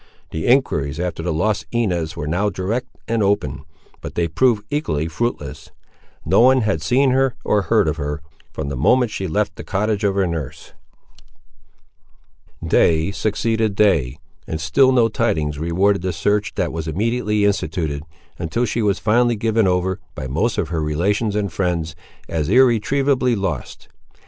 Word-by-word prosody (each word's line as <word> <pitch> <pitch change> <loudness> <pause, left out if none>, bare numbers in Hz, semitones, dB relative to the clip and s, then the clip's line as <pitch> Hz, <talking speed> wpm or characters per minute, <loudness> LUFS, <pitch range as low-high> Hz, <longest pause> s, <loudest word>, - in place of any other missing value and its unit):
The 80 - -3
enquiries 80 - +2
after 90 -2 -3
the 85 0 -2
lost 100 +7 0
Inez 90 -9 -1
were 75 - -3
now 90 +7 0
direct 105 +6 -3 0.2
and 115 -1 0
open; 75 -8 0 0.4
but - - -7
they 85 -1 +1
proved 105 +4 +2
equally 80 - -1
fruitless. 120 +9 -4 0.6
No - - +3
one 130 +2 +6
had 100 -8 0
seen 130 - +2
her, 130 -1 +2
or 105 - +2
heard 105 -1 +2
of 75 +1 -1
her, 75 0 -3 0.3
from 70 - -4
the 70 - -4
moment 120 - +3
that - - -8
she 95 - -3
left 100 +5 -1
the - - -7
cottage 105 +1 -1
of 100 -1 +1
her 100 -1 +2
nurse. 80 -6 -5 1.9
Day 80 +3 +3
succeeded 110 +1 -1
day, 80 -12 +2 0.3
and 80 - -3
still 80 - +3
no 120 -3 +4
tidings 80 -10 -1
rewarded 95 +5 +1
the 90 0 -2
search 105 +5 0
that - - -1
was 80 -1 -4
immediately 105 +4 0
instituted, 80 -7 -1 0.4
until 100 +9 -1
she 115 +1 -1
was 100 -3 +1
finally 120 +2 +2
given 110 -1 +1
over, 95 +1 0 0.2
by - - -5
most 80 - -1
of 90 -7 -1
her 80 -2 -1
relations 100 +8 0
and 100 -5 -1
friends, 85 -4 -1 0.3
as 80 -2 -2
irretrievably 130 +2 +3
lost. 95 - -4
100 Hz, 165 wpm, -20 LUFS, 80-115 Hz, 1.9 s, one